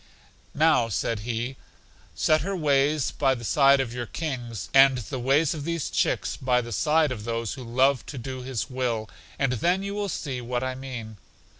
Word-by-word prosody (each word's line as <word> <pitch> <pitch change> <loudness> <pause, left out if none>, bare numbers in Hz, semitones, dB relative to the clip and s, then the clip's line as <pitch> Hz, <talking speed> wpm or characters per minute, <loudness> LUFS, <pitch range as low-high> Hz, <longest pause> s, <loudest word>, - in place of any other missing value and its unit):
Now, 150 -6 +3
said 115 +1 -1
he, 120 +4 -3 0.6
set 155 -1 +3
her 195 +4 -2
ways 145 -3 +2
by 135 -2 +1
the 120 - -9
side 140 +3 +5
of 125 -3 -2
your 120 -1 -4
King's, 120 - -4
and 135 -1 +7
the 125 +3 -5
ways 140 +6 +2
of 150 -3 -6
these 170 -1 -2
chicks - - 0
by 125 -1 +1
the 120 -1 -5
side 155 +4 +2
of 110 -4 -5
those 115 -1 -2
who 130 - -8
love 130 +1 +2
to 140 - -7
do 130 +1 -6
His 125 -3 -3
will, 125 -4 -2 0.3
and 135 -2 +1
then 175 - +1
you 200 0 -4
will 205 -1 -2
see 135 -6 -4
what 120 +1 -2
I 130 0 -2
mean. 125 -5 -7
130 Hz, 190 wpm, -26 LUFS, 120-145 Hz, 0.6 s, and